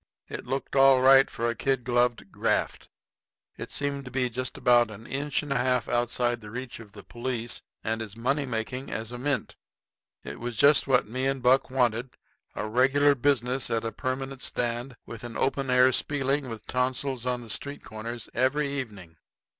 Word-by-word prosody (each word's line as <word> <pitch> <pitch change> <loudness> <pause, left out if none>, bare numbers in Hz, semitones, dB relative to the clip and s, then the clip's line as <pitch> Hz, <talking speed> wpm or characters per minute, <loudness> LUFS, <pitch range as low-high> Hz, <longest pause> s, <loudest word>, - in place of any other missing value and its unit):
It - - -7
looked 135 +2 -3
all 135 -1 +7
right 135 +1 +7
for 115 - -2
a 120 - +1
kid 135 0 -1
gloved 120 -4 +1
graft. - - -1 0.7
It - - -7
seemed 140 -1 -2
to - - -7
be 125 -1 -1
just 125 +2 -3
about 120 -2 +4
an 110 +1 -10
inch 140 +3 -2
and 145 -1 -2
a - - +1
half 125 -2 +1
outside 120 0 +1
of 120 - -7
the 105 - -10
reach 125 +2 -6
of 110 -3 -13
the 100 - -11
police, 120 -1 -3 0.2
and 110 +1 -2
as 110 -1 -7
money 135 +4 0
making 125 +3 -4
as 110 +1 -4
a 125 - -6
mint. 140 -3 -2 0.7
It - - -7
was 120 0 -4
just 140 +6 +5
what 130 -4 +3
me 130 +4 -1
and 135 -2 -1
Buck 130 +2 +4
wanted 125 -1 0 0.4
a 105 - -3
regular 135 +5 +4
business 130 -1 +1
at 115 0 0
a 115 - -2
permanent 130 +3 -4
stand, 120 +2 -3
with 115 -1 -9
an 120 -1 -6
open 135 0 0
air 125 0 +5
spieling 135 0 0
with 115 -2 -7
tonsilitis 125 0 -1
on 125 -1 0
the 115 - -10
street 140 +6 -2
corners 115 +1 -6
every 140 +3 +1
evening. 100 - -6
125 Hz, 190 wpm, -27 LUFS, 115-135 Hz, 0.7 s, all